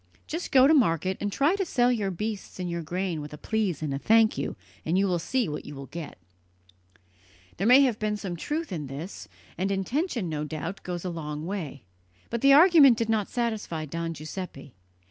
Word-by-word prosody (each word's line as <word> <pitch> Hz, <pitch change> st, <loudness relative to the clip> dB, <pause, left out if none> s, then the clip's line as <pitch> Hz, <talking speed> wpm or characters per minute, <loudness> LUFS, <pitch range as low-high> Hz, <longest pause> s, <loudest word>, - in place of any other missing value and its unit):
Just 335 Hz, +3 st, -5 dB
go 260 Hz, -1 st, +7 dB
to 300 Hz, -, +6 dB
market, 185 Hz, -, +2 dB
and 205 Hz, -, -1 dB
try 290 Hz, -, +2 dB
to 400 Hz, -, 0 dB
sell 250 Hz, -8 st, +2 dB
your 210 Hz, -5 st, 0 dB
beasts 205 Hz, +2 st, -5 dB
and 180 Hz, -, -2 dB
your 170 Hz, -1 st, -3 dB
grain 175 Hz, 0 st, -3 dB
with 150 Hz, 0 st, -8 dB
a -, -, -7 dB
'please' 195 Hz, -4 st, -1 dB
and 145 Hz, -3 st, -2 dB
a 135 Hz, -, -2 dB
'thank 225 Hz, +5 st, +4 dB
you,' 140 Hz, -, -3 dB, 0.3 s
and 165 Hz, +3 st, 0 dB
you 195 Hz, -, +3 dB
will 180 Hz, -2 st, 0 dB
see 245 Hz, +7 st, 0 dB
what 150 Hz, -, -5 dB
you 145 Hz, -, -9 dB
will 135 Hz, 0 st, -7 dB
get!" 160 Hz, +2 st, -8 dB, 1.4 s
There 195 Hz, -, 0 dB
may 255 Hz, +3 st, +8 dB
have 250 Hz, -6 st, +2 dB
been 210 Hz, -1 st, -1 dB
some 190 Hz, -4 st, -5 dB
truth 300 Hz, -, -3 dB
in 155 Hz, -6 st, -4 dB
this; 145 Hz, +8 st, -7 dB, 0.3 s
and 190 Hz, +2 st, 0 dB
intention, 235 Hz, -, -1 dB
no 150 Hz, -2 st, -3 dB
doubt, 165 Hz, +5 st, -5 dB
goes 175 Hz, -1 st, -5 dB
a 180 Hz, -, -2 dB
long 150 Hz, -2 st, -5 dB
way; 165 Hz, -, -5 dB, 0.5 s
but 235 Hz, -1 st, -2 dB
the 275 Hz, -, +6 dB
argument 295 Hz, -5 st, +8 dB
did 230 Hz, -1 st, -1 dB
not 215 Hz, -3 st, +1 dB
satisfy 220 Hz, -9 st, -2 dB
Don 165 Hz, +2 st, -4 dB
Giuseppe. 155 Hz, -3 st, -7 dB
190 Hz, 205 wpm, -27 LUFS, 160-235 Hz, 1.4 s, may